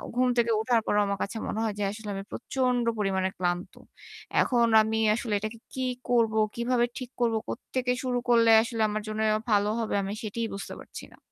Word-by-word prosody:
ঘুম 255 +1 +3
থেকে 235 -1 +3
উঠার 230 0 +2
পরেও 210 - +2
আমার 200 0 -1
কাছে 225 - -5
মনে 220 - -3
হয় 220 -2 -1
যে - - 0
আসলে 210 0 -8
আমি 195 - -5
প্রচন্ড 250 -1 0 0.2
পরিমাণে 190 -2 +1
ক্লান্ত। 175 0 -2 0.7
এখন 240 -2 +3
আমি 220 +1 0 0.2
আসলে 235 -2 -3
এটাকে 215 +2 -6
কি 260 -1 -2 0.2
করবো, 225 -3 +3 0.2
কিভাবে 240 0 +1
ঠিক 255 -1 -7
করব, 230 -2 +2
কোত্থেকে 255 - -3 0.2
শুরু 250 -1 0
করলে 230 -1 +5
আসলে 230 -1 -3
আমার 215 0 -2
জন্য 215 0 -3 0.3
ভালো 205 0 +3
হবে 220 -2 -1
আমি 195 - -3
সেটাই 225 +2 -3
বুঝতে 200 - -6
পারছি - - -10
না। - - -18
225 Hz, 190 wpm, -27 LUFS, 210-240 Hz, 0.7 s, করলে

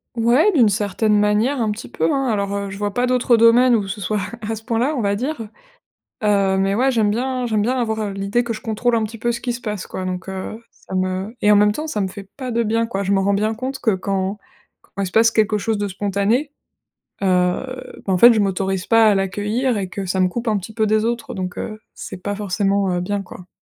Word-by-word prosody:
Ouais, 240 - +4
d'une 250 - +4
certaine 210 +1 +1
manière, 210 +6 +2
un 220 -2 +1
petit 215 +3 -6
peu, - - -5
hein. 270 -1 0
Alors, 200 -3 -1
heu, 200 0 -3
je 190 - -7
vois 205 0 -2
pas 245 +3 +1
d'autres 250 -1 +3
domaines 235 +2 +5
où 205 -3 -1
ce 205 +2 -5
soit 210 +2 -1 0.2
à 215 0 -4
à - - -1
ce 220 - -9
point-là, 240 +5 0
on 250 - -1
va 200 -1 +1
dire. 260 +5 -3 0.8
Heu, 200 -2 +2
mais, 195 +1 +1
ouais, 260 +4 +2
j'aime 220 -4 +2
bien 250 +2 -1
j'aime 215 -2 +1
bien 250 +4 0
avoir, 220 -2 -1
heu, 205 -2 -2
l'idée 200 +5 0
que 235 -1 -3
je 215 - -8
contrôle 230 +2 0
un 225 - +1
petit 220 +2 -5
peu 240 +2 0
ce 240 +1 -5
qui 245 -1 -2
se 240 - -7
passe, 210 -4 -4
quoi. 185 - -5
Donc, 185 +1 -4
heu, 190 +4 -6
ça - - -13
me 185 +3 -2
et 210 - +4
en - - +6
même 210 0 +5
temps, 305 +9 -4
ça 215 - -3
me 195 - 0
fait 195 +1 -10
pas 255 -2 -4
de 235 0 +1
bien, 230 +1 +1
quoi. 200 -4 -3
Je 200 0 -1
me 195 - +3
rends 200 +1 +2
bien 215 +2 0
compte 265 +4 -4
que, 230 - +1
quand 195 +1 -2 0.5
quand 200 - -7
il 195 - -1
se 180 - -9
passe 225 0 +4
quelque 215 -1 +2
chose 215 0 -1
de 205 - -1
spontané, 205 +8 0 0.7
heu, 185 +8 -1
bah, 195 - -1
en 180 - +2
fait, 235 +4 +8
je 215 - +2
m'autorise 195 -1 -1
pas 225 -1 +5
à 210 - +5
l'accueillir, 210 +5 0
et 190 -2 -3
que 195 +2 -5
ça 190 +1 -1
me 185 - +4
coupe 235 +6 -5
un 215 -2 +2
petit 210 +3 -9
peu 220 -1 +1
des 215 +1 +2
autres. 235 0 -3
Donc, 185 -1 -4
heu, 215 -1 -6
c'est 185 -1 -8
pas 205 0 -3
forcément, 200 -1 0
heu, 175 - -1
bien, 200 +2 -2
quoi. 180 -1 -12
210 Hz, 260 wpm, -20 LUFS, 195-235 Hz, 0.8 s, fait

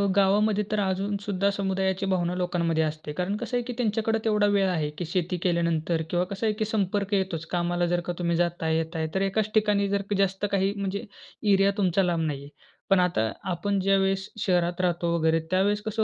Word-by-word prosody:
गावामध्ये 205 +2 +3
तर 215 - +1
अजून 195 +1 0
सुद्धा 200 -1 0
समुदायाची 190 -1 -1
भावना 180 -2 0
लोकांमध्ये 170 -3 0
असते. 155 -1 -4
कारण 180 +5 -2
कसं 245 - -4
आहे 245 - -1
की 245 - -3
त्यांच्याकडे 225 -1 0
तेवढा 210 -1 +3
वेळ 200 -1 +3
आहे 155 -4 -1
की 175 - -3
शेती 180 +1 -1
केल्यानंतर 170 -2 +1
किंवा 175 0 +1
कसं 200 +4 -4
आहे 210 - +2
की 215 - +1
संपर्क 205 -1 -1
येतोच 190 -4 -1
कामाला 175 0 0
जर 175 0 +1
का 175 - -2
तुम्ही 170 -1 +1
जाताय, 170 -2 0
येताय, 160 0 -2
तर 190 - +1
एकाच 205 +2 0
ठिकाणी 210 -2 +2
जर 200 0 +1
का 205 - +1
जास्त 195 +1 +1
काही 195 0 +1
म्हणजे 200 +2 -3 0.5
एरिया 195 +1 +4
तुमचा 190 -1 +2
लांब 170 -2 0
नाहीये. 140 -1 -5 0.4
पण 195 -1 +5
आता 170 -12 +1 0.2
आपण 195 +3 -1
ज्यावेळेस 195 0 +1
शहरात 180 -2 +1
राहतो 170 -1 0
वगैरे, 160 0 +2
त्यावेळेस 205 +3 +2
कसं 220 +1 -1
190 Hz, 195 wpm, -26 LUFS, 175-200 Hz, 0.5 s, पण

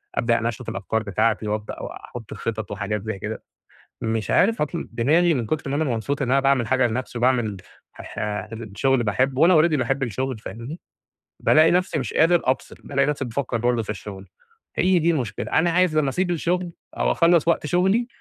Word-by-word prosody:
أبدأ 115 -1 +2
أنشّط 115 -1 -3
الأفكار 110 0 -2
بتاعتي 110 +1 0
وأبدأ 105 0 -4
واحط 115 -3 -9
الخطط 110 -3 -4
وحاجات 105 0 -3
زي 110 -3 -4
كده، - - -5 0.6
مش 110 -1 -1
عارف 225 -1 +3
أطل 165 +3 -3
دماغي 160 +9 +3
من 120 -5 -2
كتر 145 +1 -2
ما 140 - 0
أنا 160 - +1
مبسوط 130 +1 -2
إن 125 - -1
أنا 135 +1 +4
باعمل 135 -4 +2
حاجة 130 +1 +3
لنفْسي 120 +1 -3
وباعمل 120 -5 +1 0.4
ح - - -11 0.2
ح 105 -1 -3 0.3
شغل 135 -2 +2
باحبه 130 +6 0
وأنا 175 0 +6
already 160 -2 +2
باحب 135 +2 -1
الشغل 130 +1 -2
فاهمني، 120 +9 -8 0.6
بالاقي 155 +1 +5
نفْسي 180 -3 +1
مش 125 -6 -4
قادر 170 +2 +4
أفصل، 130 +1 -1
بالاقي 140 -1 +1
نفْسي 145 -2 -1
بافكّر 120 0 -2
برضه 120 0 +1
في 105 - -13
الشغل، 95 -1 -8 0.5
هي 185 -1 +3
دي 170 +1 +3
المشكلة، 130 -10 -3
أنا 170 +2 +3
عايز 175 -2 +2
لمّا 145 -3 +2
أسيب 175 +5 -1
الشغل 175 +1 -1 0.3
أو - - +2
أخلّص 170 -2 +3
وقت 170 -2 +2
شغلي، 190 +8 +2
130 Hz, 190 wpm, -23 LUFS, 110-160 Hz, 0.6 s, وأنا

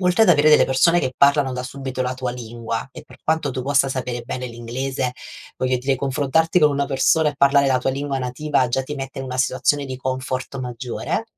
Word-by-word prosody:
oltre 180 +4 +3
ad 180 - +5
avere 150 0 +5
delle 150 - +6
persone 170 +6 +3
che 130 - -2
parlano 140 -1 +4
da 125 0 -4
subito 130 0 -6
la 125 0 -2
tua 130 -1 -3
lingua 115 -1 -5
e - - -10
per - - -17
quanto 160 -2 0
tu 130 0 -4
possa 140 0 +2
sapere 125 -2 -3
bene 125 +1 -5
l'inglese, 125 +2 -3 0.5
voglio 130 0 +1
dire, 135 +1 0
confrontarti 145 +6 +1
con 150 -1 +5
una 140 0 0
persona 150 +4 +2
e - - -13
parlare 140 0 +4
la 130 - +3
tua 135 - 0
lingua 140 0 -3
nativa 130 +1 0
già 135 +2 0
ti 150 +3 -6
mette 135 -1 -6
in 135 - -6
una 130 0 -5
situazione 140 +2 +1
di 130 -1 -5
comfort 130 +1 -3
maggiore 125 - -4
135 Hz, 215 wpm, -21 LUFS, 125-140 Hz, 0.5 s, delle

